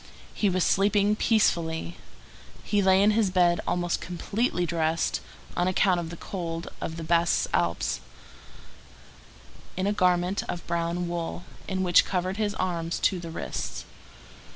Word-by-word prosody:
He 205 - +1
was 185 -1 +1
sleeping 205 +1 +3
peacefully. 170 -7 +1 0.7
He 205 -1 +1
lay 190 0 +5
in 210 - +5
his 215 -2 +2
bed 175 -2 +3
almost 175 -1 0
completely 180 +2 -1
dressed, 165 -1 0 0.3
on 175 - +1
account 185 -1 +3
of 165 -1 -4
the 170 - -8
cold 165 -3 -5
of 165 - -4
the 165 - -5
Basses 170 +1 +2
Alps, 85 -2 0 1.8
in 190 - 0
a 205 - +1
garment 180 0 +2
of 175 - -4
brown 170 +1 -1
wool, 170 0 -4 0.3
which 185 -2 +4
covered 185 +1 -2
his 210 -2 -1
arms 170 -2 -2
to 185 - +2
the 170 -1 -7
wrists. 165 - -5
175 Hz, 140 wpm, -27 LUFS, 170-195 Hz, 1.8 s, lay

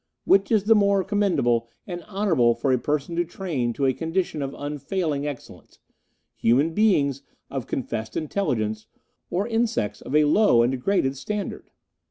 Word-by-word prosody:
Which 195 +2 +3
is 215 -3 +3
it - - -22
the 225 - +7
more 200 -2 +3
commendable 175 - +1 0.2
and 175 -2 -6
honourable 180 - +2
for 130 +3 0
a 125 - +2
person 150 +5 -2
to 175 - +3
train 160 -9 -3
to 140 - -1
a 130 - +3
condition 165 +1 -2
of 135 0 -4
unfailing 150 +1 -2
excellence, 145 -4 -9 0.6
human 140 +8 +2
beings 145 - +2 0.3
of 135 -4 -4
confessed 115 -3 -4
intelligence 110 - -2 0.4
or 195 +5 -1
insects 225 - -1
of 140 - -4
a 150 0 +5
low 150 - +4
and 120 - +2
degraded 135 0 0
standard? 210 +8 -5
150 Hz, 160 wpm, -24 LUFS, 130-195 Hz, 0.6 s, the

